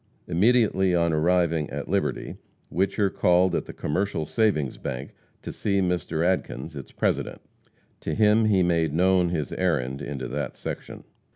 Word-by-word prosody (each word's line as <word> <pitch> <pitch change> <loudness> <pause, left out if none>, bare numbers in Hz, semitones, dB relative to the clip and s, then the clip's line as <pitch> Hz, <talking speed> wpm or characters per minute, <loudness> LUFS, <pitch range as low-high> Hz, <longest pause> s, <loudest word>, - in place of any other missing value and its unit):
Immediately 95 -1 +3
on 85 -1 +2
arriving 85 -1 +2
at 70 0 -5
Liberty, - - -2 0.4
Whicher 95 +2 +1
called 90 +1 +3
at - - -1
the - - -8
Commercial 90 +1 -2
Savings 75 - 0
Bank 65 0 -5 0.3
to - - -6
see 100 -2 0
Mr. 85 -3 0
Adkins, 85 -5 -2
its 70 - -8
president. - - -1 0.6
To - - -3
him 110 +1 +4
he 100 -4 +3
made 85 -3 +1
known 90 0 +3
his 75 -6 -2
errand 70 -7 -1
into 70 -2 -5
that 75 -2 -4
section. - - -7
85 Hz, 150 wpm, -25 LUFS, 75-95 Hz, 0.6 s, him